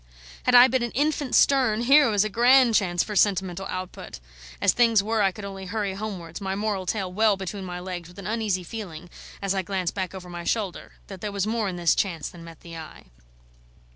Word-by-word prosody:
Had 250 Hz, -, +4 dB
I 245 Hz, +1 st, +10 dB
been 260 Hz, 0 st, 0 dB
an 240 Hz, -, -1 dB
infant 290 Hz, 0 st, 0 dB
Sterne, 255 Hz, -6 st, +4 dB
here 275 Hz, +3 st, +6 dB
was 205 Hz, -2 st, +3 dB
a -, -, -1 dB
grand 245 Hz, +2 st, +5 dB
chance 175 Hz, -5 st, +2 dB
for 210 Hz, -, -6 dB
sentimental 190 Hz, -2 st, +1 dB
output! 185 Hz, -, -7 dB, 0.4 s
As -, -, +4 dB
things 230 Hz, -4 st, +4 dB
were, 220 Hz, +1 st, 0 dB
I 195 Hz, -1 st, +3 dB
could 200 Hz, +2 st, -9 dB
only 195 Hz, -1 st, -7 dB
hurry 205 Hz, 0 st, -2 dB
homewards, 190 Hz, -4 st, -6 dB
my 190 Hz, 0 st, -2 dB
moral 200 Hz, -2 st, -2 dB
tail 190 Hz, -3 st, -2 dB
well 215 Hz, 0 st, +3 dB
between 190 Hz, +1 st, -6 dB
my 180 Hz, -1 st, -6 dB
legs, 180 Hz, -2 st, -6 dB
with 180 Hz, -, -17 dB
an 200 Hz, -, -9 dB
uneasy 210 Hz, -3 st, -1 dB
feeling, 175 Hz, -4 st, -8 dB, 0.3 s
as 195 Hz, -1 st, +1 dB
I 195 Hz, -, 0 dB
glanced 185 Hz, -2 st, -2 dB
back 190 Hz, -1 st, -4 dB
over 180 Hz, -1 st, -9 dB
my 175 Hz, -1 st, -7 dB
shoulder, 200 Hz, -2 st, -3 dB
that 190 Hz, -3 st, -10 dB
there 210 Hz, -, -3 dB
was 200 Hz, -1 st, -1 dB
more 220 Hz, -2 st, -1 dB
in 180 Hz, -, -5 dB
this 175 Hz, -2 st, +2 dB
chance 165 Hz, -7 st, -2 dB
than 170 Hz, -2 st, -13 dB
met 165 Hz, -2 st, -13 dB
the 170 Hz, -1 st, -10 dB
eye. 155 Hz, -, -11 dB
195 Hz, 220 wpm, -25 LUFS, 180-220 Hz, 0.4 s, I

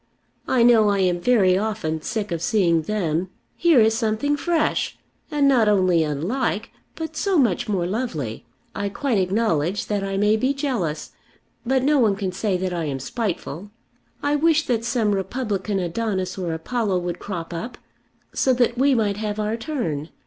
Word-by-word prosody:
I 250 Hz, -2 st, +3 dB
know 225 Hz, -3 st, +6 dB
I 200 Hz, -, +2 dB
am 180 Hz, -2 st, +1 dB
very 195 Hz, -5 st, +4 dB
often 205 Hz, -7 st, -2 dB
sick 210 Hz, +1 st, -3 dB
of 165 Hz, -2 st, -2 dB
seeing 175 Hz, -5 st, +2 dB
them. 175 Hz, -2 st, -1 dB, 0.3 s
Here 335 Hz, -6 st, +4 dB
is 220 Hz, 0 st, +4 dB
something 225 Hz, +5 st, 0 dB
fresh, 330 Hz, +2 st, 0 dB, 0.3 s
and 290 Hz, -2 st, +2 dB
not 240 Hz, -6 st, +4 dB
only 185 Hz, -4 st, +3 dB
unlike, 200 Hz, -, -2 dB, 0.2 s
but 320 Hz, -1 st, -6 dB
so 390 Hz, +2 st, +1 dB
much 235 Hz, -, +1 dB
more 185 Hz, -4 st, 0 dB
lovely. 175 Hz, -, -3 dB, 0.3 s
I 200 Hz, -, -2 dB
quite 230 Hz, +1 st, 0 dB
acknowledge 185 Hz, -2 st, 0 dB
that 205 Hz, -2 st, -2 dB
I 195 Hz, 0 st, -2 dB
may 210 Hz, +2 st, +3 dB
be 260 Hz, +5 st, 0 dB
jealous, 240 Hz, -, -2 dB, 0.6 s
but 260 Hz, 0 st, +2 dB
no 290 Hz, +1 st, +3 dB
one 215 Hz, -5 st, +3 dB
can 195 Hz, -2 st, -3 dB
say 190 Hz, 0 st, -1 dB
that 185 Hz, 0 st, -2 dB
I 170 Hz, -2 st, -2 dB
am 135 Hz, -3 st, -3 dB
spiteful. 190 Hz, -, -4 dB, 0.5 s
I 290 Hz, +1 st, +2 dB
wish 315 Hz, 0 st, +3 dB
that 230 Hz, -3 st, 0 dB
some 235 Hz, -3 st, +1 dB
republican 200 Hz, 0 st, -2 dB
Adonis 185 Hz, 0 st, -2 dB
or 180 Hz, -3 st, -3 dB
Apollo 195 Hz, +4 st, -1 dB
would 175 Hz, -1 st, -3 dB
crop 175 Hz, -4 st, -5 dB
up, 235 Hz, +9 st, -6 dB, 0.6 s
so 260 Hz, -, +2 dB
that 245 Hz, -1 st, +1 dB
we 275 Hz, 0 st, +4 dB
might 205 Hz, -3 st, 0 dB
have 210 Hz, 0 st, -3 dB
our 215 Hz, +1 st, -1 dB
turn. 180 Hz, -, -3 dB
210 Hz, 170 wpm, -23 LUFS, 180-245 Hz, 0.6 s, know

